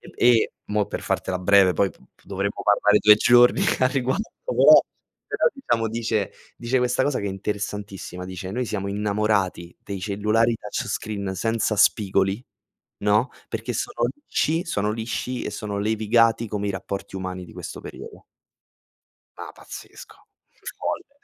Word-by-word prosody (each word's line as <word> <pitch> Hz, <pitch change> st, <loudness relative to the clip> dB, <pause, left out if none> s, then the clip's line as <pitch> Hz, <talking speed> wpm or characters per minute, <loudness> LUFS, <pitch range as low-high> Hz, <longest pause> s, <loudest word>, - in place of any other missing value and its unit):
E 120 Hz, -2 st, +4 dB, 0.2 s
mo' 105 Hz, -1 st, +1 dB
per -, -, -5 dB
fartela 90 Hz, -1 st, -2 dB
breve 95 Hz, -1 st, +5 dB
poi 100 Hz, -, +2 dB
p -, -, -19 dB, 0.2 s
p -, -, -28 dB
dovremmo 100 Hz, +1 st, -3 dB
parlare 105 Hz, 0 st, +4 dB
2 105 Hz, 0 st, +8 dB
giorni 120 Hz, +2 st, +5 dB, 0.2 s
a 130 Hz, -, +4 dB
riguardo, 135 Hz, -, -1 dB
però -, -, +7 dB, 0.5 s
però -, -, +2 dB
diciamo 115 Hz, -, -1 dB
dice 110 Hz, -3 st, -1 dB, 0.3 s
dice 125 Hz, +2 st, 0 dB
questa 125 Hz, +1 st, +1 dB
cosa 140 Hz, -1 st, 0 dB
che 100 Hz, -, -4 dB
è -, -, -2 dB
interessantissima, 100 Hz, -2 st, -5 dB
dice: 95 Hz, 0 st, -6 dB
"Noi 125 Hz, +3 st, -2 dB
siamo 100 Hz, -2 st, -3 dB
innamorati 100 Hz, -3 st, -1 dB
dei 100 Hz, -2 st, -5 dB
cellulari 105 Hz, +4 st, +1 dB
touch 105 Hz, -, -5 dB
screen 100 Hz, -3 st, -3 dB
senza 115 Hz, +2 st, 0 dB
spigoli, 100 Hz, +1 st, +2 dB, 0.6 s
no? 105 Hz, +4 st, +3 dB, 0.2 s
Perché 115 Hz, +2 st, -4 dB
sono 120 Hz, +2 st, -1 dB
lisci, 160 Hz, +3 st, -1 dB
sono 105 Hz, -9 st, -1 dB
lisci 115 Hz, +3 st, -3 dB
e -, -, -4 dB
sono 105 Hz, -1 st, -4 dB
levigati 110 Hz, +2 st, +2 dB
come 105 Hz, -1 st, -3 dB
i 100 Hz, -, 0 dB
rapporti 95 Hz, +1 st, -6 dB
umani 95 Hz, -1 st, -5 dB
di 80 Hz, -, -14 dB
questo -, -, -8 dB
periodo". -, -, -10 dB, 1.1 s
Ma -, -, -8 dB
pazzesco. -, -, -12 dB, 0.6 s
Folle 280 Hz, 0 st, -5 dB
105 Hz, 150 wpm, -24 LUFS, 100-115 Hz, 1.1 s, 2